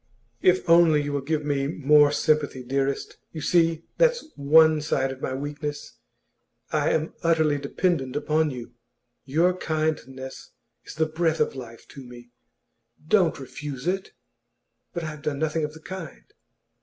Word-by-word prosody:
'If 185 Hz, 0 st, +3 dB
only 165 Hz, -3 st, +5 dB
you 145 Hz, 0 st, -3 dB
will 140 Hz, -, -1 dB
give 150 Hz, +2 st, -2 dB
me 140 Hz, -2 st, 0 dB
more 150 Hz, 0 st, +4 dB
sympathy, 145 Hz, -3 st, 0 dB
dearest. 135 Hz, +2 st, -2 dB, 0.2 s
You 160 Hz, -, -6 dB
see, 165 Hz, -1 st, +2 dB, 0.2 s
that's 485 Hz, -4 st, +3 dB
one 155 Hz, +2 st, +5 dB
side 135 Hz, -3 st, 0 dB
of 130 Hz, 0 st, -9 dB
my 130 Hz, -, -2 dB
weakness. 145 Hz, +1 st, -6 dB, 0.7 s
I -, -, +1 dB
am 160 Hz, +1 st, 0 dB
utterly 160 Hz, -3 st, +2 dB
dependent 140 Hz, -2 st, -1 dB
upon 155 Hz, +1 st, +1 dB
you. 125 Hz, -3 st, -8 dB, 0.5 s
Your 165 Hz, +7 st, +2 dB
kindness 155 Hz, -6 st, -4 dB, 0.3 s
is -, -, -10 dB
the 160 Hz, +1 st, +2 dB
breath 160 Hz, 0 st, 0 dB
of 150 Hz, -, +1 dB
life 115 Hz, -3 st, -10 dB
to 135 Hz, -, -11 dB
me. 120 Hz, -1 st, -13 dB, 0.8 s
Don't 180 Hz, -5 st, +3 dB
refuse 135 Hz, 0 st, -7 dB
it!' 190 Hz, +2 st, -2 dB, 0.8 s
'But 170 Hz, -, -4 dB
I 155 Hz, -, -4 dB
have 150 Hz, -1 st, -11 dB
done 150 Hz, -2 st, -2 dB
nothing 155 Hz, +1 st, -1 dB
of 150 Hz, 0 st, -3 dB
the -, -, -11 dB
kind. 185 Hz, -2 st, -8 dB
150 Hz, 155 wpm, -25 LUFS, 140-160 Hz, 0.8 s, only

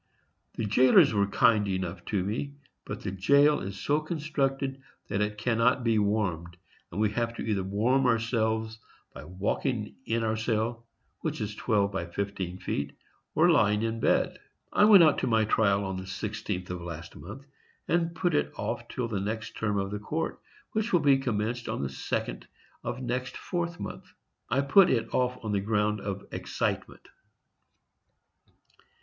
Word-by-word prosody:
The 115 Hz, -, -2 dB
jailers 125 Hz, +3 st, +5 dB
are 100 Hz, -1 st, +2 dB
kind 105 Hz, 0 st, +3 dB
enough 95 Hz, -1 st, -3 dB
to 100 Hz, -4 st, 0 dB
me, 125 Hz, +8 st, -3 dB, 0.3 s
but 105 Hz, -, -6 dB
the 100 Hz, -, -3 dB
jail 140 Hz, +10 st, +4 dB
is 95 Hz, 0 st, -6 dB
so 145 Hz, +1 st, +1 dB
constructed 140 Hz, -4 st, -2 dB, 0.3 s
that 100 Hz, 0 st, 0 dB
it 105 Hz, 0 st, -1 dB
cannot 120 Hz, +3 st, +2 dB
be 115 Hz, -2 st, +3 dB
warmed, 95 Hz, -5 st, -1 dB, 0.3 s
and -, -, -4 dB
we 105 Hz, -1 st, +2 dB
have 115 Hz, +1 st, -1 dB
to -, -, -5 dB
either 105 Hz, -3 st, 0 dB
warm 115 Hz, +8 st, +2 dB
ourselves 110 Hz, -1 st, 0 dB, 0.3 s
by -, -, -9 dB
walking 105 Hz, -, -2 dB
in 115 Hz, +1 st, 0 dB
our 110 Hz, 0 st, +1 dB
cell, 115 Hz, +1 st, -1 dB, 0.3 s
which -, -, -3 dB
is 105 Hz, 0 st, -3 dB
twelve 105 Hz, -2 st, +1 dB
by 95 Hz, -4 st, -3 dB
fifteen 95 Hz, 0 st, -4 dB
feet, 70 Hz, -6 st, -3 dB, 0.4 s
or -, -, +5 dB
by -, -, +6 dB
lying 105 Hz, +1 st, +3 dB
in 115 Hz, 0 st, -1 dB
bed. -, -, +1 dB, 0.3 s
I 210 Hz, -, +6 dB
went 205 Hz, -5 st, +9 dB
out 155 Hz, -2 st, +4 dB
to -, -, -1 dB
my 110 Hz, -2 st, +3 dB
trial 100 Hz, -2 st, +2 dB
on 95 Hz, -1 st, -3 dB
the 95 Hz, -, -6 dB
16th 100 Hz, -3 st, -4 dB
of 90 Hz, -1 st, -5 dB
last 85 Hz, 0 st, -8 dB
month, 100 Hz, -, -10 dB, 0.4 s
and 170 Hz, 0 st, +1 dB
put 175 Hz, 0 st, 0 dB
it 145 Hz, -, +1 dB
off -, -, -3 dB
till 125 Hz, -2 st, -3 dB
the 105 Hz, -4 st, -2 dB
next 110 Hz, +2 st, -4 dB
term 105 Hz, -2 st, -1 dB
of 95 Hz, 0 st, -1 dB
the 105 Hz, -, -3 dB
court, 160 Hz, +10 st, -3 dB, 0.3 s
which 220 Hz, +1 st, -1 dB
will 175 Hz, -, +4 dB
be 140 Hz, -2 st, +5 dB
commenced 120 Hz, -1 st, -2 dB
on -, -, -2 dB
the 70 Hz, -, -2 dB
second 65 Hz, -2 st, -4 dB, 0.4 s
of 130 Hz, -, -4 dB
next 125 Hz, +1 st, -3 dB
4th 175 Hz, -1 st, -3 dB
month. -, -, -7 dB, 0.4 s
I 140 Hz, -, +2 dB
put 175 Hz, +7 st, +6 dB
it 115 Hz, -3 st, 0 dB
off 125 Hz, 0 st, +1 dB
on 110 Hz, -, -1 dB
the 100 Hz, -1 st, +1 dB
ground 105 Hz, 0 st, 0 dB
of 100 Hz, -1 st, -5 dB
excitement. -, -, -3 dB
110 Hz, 175 wpm, -28 LUFS, 100-130 Hz, 0.4 s, went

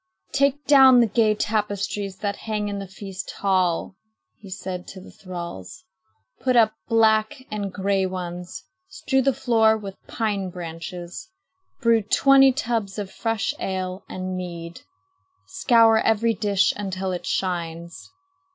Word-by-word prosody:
"Take 280 Hz, +1 st, +1 dB
down 265 Hz, -3 st, +7 dB
the 235 Hz, -, +5 dB
gay 215 Hz, 0 st, +2 dB
tapestries 205 Hz, -2 st, -2 dB
that 205 Hz, -1 st, -1 dB
hang 210 Hz, -1 st, -1 dB
in 200 Hz, 0 st, -4 dB
the 195 Hz, -, -6 dB
feast 190 Hz, 0 st, -8 dB
hall," 175 Hz, -, 0 dB, 0.4 s
he 200 Hz, -, -12 dB
said 185 Hz, -1 st, -6 dB
to 190 Hz, -, -9 dB
the 185 Hz, -, -13 dB
thralls. 175 Hz, -, -8 dB, 0.6 s
"Put 255 Hz, -1 st, +1 dB
up 220 Hz, -2 st, +5 dB
black 225 Hz, +4 st, +2 dB
and 205 Hz, -2 st, -3 dB
gray 195 Hz, 0 st, 0 dB
ones. 180 Hz, -3 st, -6 dB, 0.2 s
Strew 110 Hz, -, 0 dB
the 275 Hz, +1 st, +3 dB
floor 225 Hz, -4 st, +3 dB
with 200 Hz, -2 st, -7 dB
pine 205 Hz, -5 st, -2 dB
branches. 175 Hz, -, -8 dB, 0.5 s
Brew 230 Hz, -2 st, +4 dB
twenty 270 Hz, +5 st, +5 dB
tubs 225 Hz, -6 st, -2 dB
of 200 Hz, -2 st, -5 dB
fresh 225 Hz, -3 st, -1 dB
ale 185 Hz, 0 st, -3 dB
and 185 Hz, 0 st, -4 dB
mead. 170 Hz, -2 st, -7 dB, 0.6 s
Scour 230 Hz, -2 st, +4 dB
every 225 Hz, +1 st, +2 dB
dish 200 Hz, -1 st, +1 dB
until 190 Hz, -2 st, -3 dB
it 180 Hz, -, -5 dB
shines." 170 Hz, -2 st, -3 dB
200 Hz, 135 wpm, -23 LUFS, 185-225 Hz, 0.6 s, down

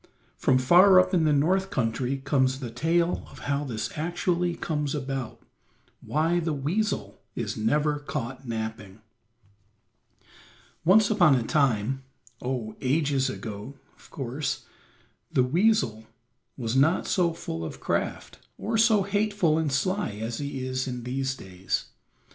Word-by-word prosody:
From 130 Hz, -, +3 dB
far 180 Hz, +9 st, +7 dB
up 185 Hz, +1 st, +2 dB
in 170 Hz, -3 st, +3 dB
the 155 Hz, -, +4 dB
North 185 Hz, +7 st, +2 dB
country 125 Hz, -, -1 dB
comes 130 Hz, -2 st, +2 dB
the 125 Hz, -4 st, -5 dB
tale 170 Hz, +7 st, +1 dB
of -, -, -14 dB
how 140 Hz, 0 st, 0 dB
this 115 Hz, -6 st, -4 dB
actually 175 Hz, +2 st, 0 dB
comes 150 Hz, -3 st, -2 dB
about; 135 Hz, -3 st, -4 dB, 0.6 s
why 165 Hz, +3 st, +1 dB
the 165 Hz, -2 st, -1 dB
weasel 185 Hz, +10 st, -2 dB
is -, -, -3 dB
never 145 Hz, +7 st, +1 dB
caught 135 Hz, -3 st, -5 dB
napping. 110 Hz, -3 st, -5 dB, 1.8 s
Once 205 Hz, +5 st, +5 dB
upon 175 Hz, -9 st, +5 dB
a 125 Hz, -, +1 dB
time, 135 Hz, -1 st, +1 dB, 0.4 s
oh, 125 Hz, -4 st, -3 dB
ages 140 Hz, -1 st, +1 dB
ago, 110 Hz, +1 st, -7 dB, 0.2 s
of -, -, -20 dB
course, 135 Hz, +1 st, -3 dB, 0.7 s
the 130 Hz, -, +3 dB
weasel 130 Hz, -, +1 dB, 0.5 s
was 120 Hz, -2 st, -2 dB
not 155 Hz, +7 st, +3 dB
so 175 Hz, -3 st, +2 dB
full 80 Hz, -, -5 dB
of 80 Hz, -, -6 dB
craft, -, -, -3 dB, 0.2 s
or 225 Hz, 0 st, -1 dB
so 220 Hz, -3 st, +5 dB
hateful 200 Hz, -5 st, +1 dB
and 155 Hz, -3 st, 0 dB
sly 185 Hz, -, 0 dB
as 110 Hz, +2 st, -4 dB
he 140 Hz, -2 st, -4 dB
is 130 Hz, +1 st, -2 dB
in 125 Hz, -2 st, -4 dB
these 130 Hz, +2 st, -2 dB
days. 95 Hz, -4 st, -4 dB
140 Hz, 135 wpm, -27 LUFS, 125-170 Hz, 1.8 s, far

